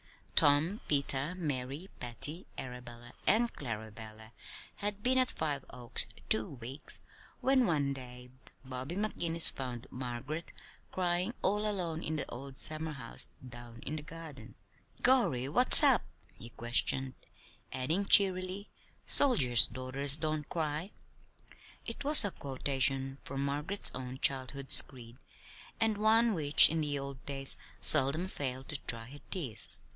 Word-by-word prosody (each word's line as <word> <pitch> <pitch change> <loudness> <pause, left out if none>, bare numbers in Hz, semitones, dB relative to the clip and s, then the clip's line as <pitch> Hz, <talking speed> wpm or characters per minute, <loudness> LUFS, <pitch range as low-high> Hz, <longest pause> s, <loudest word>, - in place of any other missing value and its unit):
Tom, 150 +8 +3
Peter, 140 +2 0
Mary, 145 -1 -5
Patty, 135 +8 -5
Arabella, 120 -1 -10
and 235 +2 +2
Clarabella 110 -2 -9 0.5
had 205 0 -5
been 260 +1 +2
at 255 0 +1
Five 145 -4 -4
Oaks 120 -1 -3 0.2
two 110 0 +1
weeks 130 +2 -3 0.4
when 260 -2 +2
one 145 -4 -1
day 125 -1 -11 0.3
Bobby 130 +5 -6
McGinnis 170 -5 +1
found 125 -2 -7
Margaret 130 +6 -7 0.4
crying 180 +4 -2
all 210 +2 0
alone 170 -5 -4
in 160 - -4
the 150 - -4
old 135 +2 -10
summerhouse 155 -6 0 0.2
down 120 -1 -12
in 155 +4 -5
the - - -6
garden. 150 -6 -12 0.5
"Gorry, 235 - +2
what's 245 - +8
up?" - - +4 0.3
he 115 - -13
questioned; 125 +3 0 0.6
adding 160 +10 -2
cheerily: 190 0 +2 0.3
"'Soldiers' 135 - +4
daughters 130 +3 -4
don't 155 -2 -4
cry'!" 160 +2 -4 1.0
it 230 +4 -6
was 290 -5 +10
a 200 - 0
quotation 135 -1 -1
from 135 +1 -5
Margaret's 150 +8 -3
own 130 0 -8
childhood's 135 0 +3
creed, 120 -2 -15 0.6
and 220 -2 0
one 225 +2 +3
which 150 -5 +7
in 165 0 -2
the 145 -1 -2
old 140 -1 -8
days 135 -1 -2 0.2
seldom 155 +5 +5
failed 130 -6 -5
to 145 - 0
dry 115 -1 0
her 145 +3 -13
tears. 135 - -2
140 Hz, 130 wpm, -31 LUFS, 130-175 Hz, 1.0 s, was